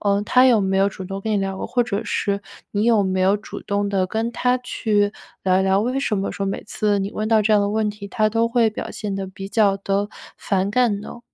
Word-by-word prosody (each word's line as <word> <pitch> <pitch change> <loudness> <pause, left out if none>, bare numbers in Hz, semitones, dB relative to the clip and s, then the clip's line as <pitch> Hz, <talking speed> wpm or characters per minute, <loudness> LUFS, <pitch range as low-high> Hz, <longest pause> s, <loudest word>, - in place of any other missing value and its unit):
嗯， 200 0 +2
他 255 +4 +5
有 235 -4 +5
没 190 0 0
有 195 - +4
主 190 -1 -8
动 195 +1 -5
跟 220 +2 -3
你 210 - +2
聊 195 -1 -2
过？ - - -4
或 245 - +1
者 225 -2 -2
是 200 -1 -1 0.3
你 205 +1 0
有 225 -3 +4
没 190 0 0
有 195 +2 +4
主 210 - -9
动 200 0 -1
地 190 -2 +1
跟 225 +4 -2
他 250 +1 +1
去 210 -4 0 0.3
聊 185 0 +3
聊， 190 0 +3
为 255 +4 -1
什 220 -6 0
么 195 0 -2
说 200 -1 -3
每 195 - -3
次 210 -1 0
你 195 +1 -3
问 215 0 -2
到 220 -1 +4
这 215 +1 +2
样 210 - +5
的 200 - +1
问 215 0 0
题， 205 -1 -9
他 215 -1 +1
都 230 +1 +1
会 230 -2 +3
表 215 - -6
现 205 -2 -4
得 195 0 -3
比 195 +1 -8
较 200 -2 +3
地 200 +1 -1 0.3
反 195 0 0
感 220 -3 +2
呢？ 235 - -9
205 Hz, 275 characters per minute, -22 LUFS, 195-220 Hz, 0.3 s, 他